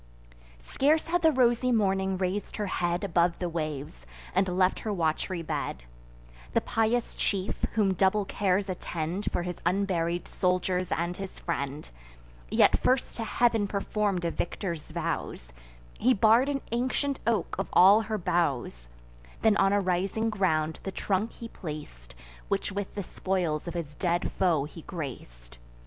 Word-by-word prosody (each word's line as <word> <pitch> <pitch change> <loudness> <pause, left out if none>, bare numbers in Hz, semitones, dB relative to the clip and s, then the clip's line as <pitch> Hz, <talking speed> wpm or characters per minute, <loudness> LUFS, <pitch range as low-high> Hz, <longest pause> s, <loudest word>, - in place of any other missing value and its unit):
Scarce 305 - +1
had 350 +1 +2
the 320 -1 +5
rosy 250 -2 +3
Morning 190 -4 +1
rais'd 190 +2 -2
her 210 - -2
head 175 -1 -1
Above 170 -2 +2
the 180 - -2
waves, 150 - -5 0.3
and 190 - +2
left 185 0 +3
her 220 - -3
wat'ry 170 0 -1
bed; 105 - -3 0.7
The - - +3
pious 225 +2 0
chief, 195 -1 -2
whom 205 -4 +3
double 195 +2 +2
cares 195 0 0
attend 180 0 -3
For - - -1
his 175 -1 -4
unburied 175 -2 0
soldiers 180 -1 0
and 175 +1 -1
his 195 0 -7
friend, 145 -3 -3 0.6
Yet - - +4
first 255 0 +1
to 230 - -2
Heav'n 225 -2 +2
perform'd 200 -2 -1
a 170 - +1
victor's 170 -2 -4
vows: - - -3 0.5
He 255 +3 +4
bar'd 225 +6 +5
an 275 -1 -1
ancient 260 +3 0
oak 225 -6 +1
of - - -1
all 200 +4 +7
her 215 0 -2
boughs; 135 - -1 0.5
Then 220 -2 +5
on 195 0 +4
a 205 - +3
rising 195 +4 0
ground 160 -6 0
the 195 - -4
trunk 200 +3 -1
he 230 - -8
plac'd, 150 - -8 0.3
Which - - -1
with 200 0 -4
the 200 - -3
spoils 175 -4 -2
of 170 - -5
his 160 -4 -4
dead 175 +2 0
foe 170 -7 +2
he 160 +2 -10
grac'd. - - -8
185 Hz, 155 wpm, -28 LUFS, 170-210 Hz, 0.7 s, all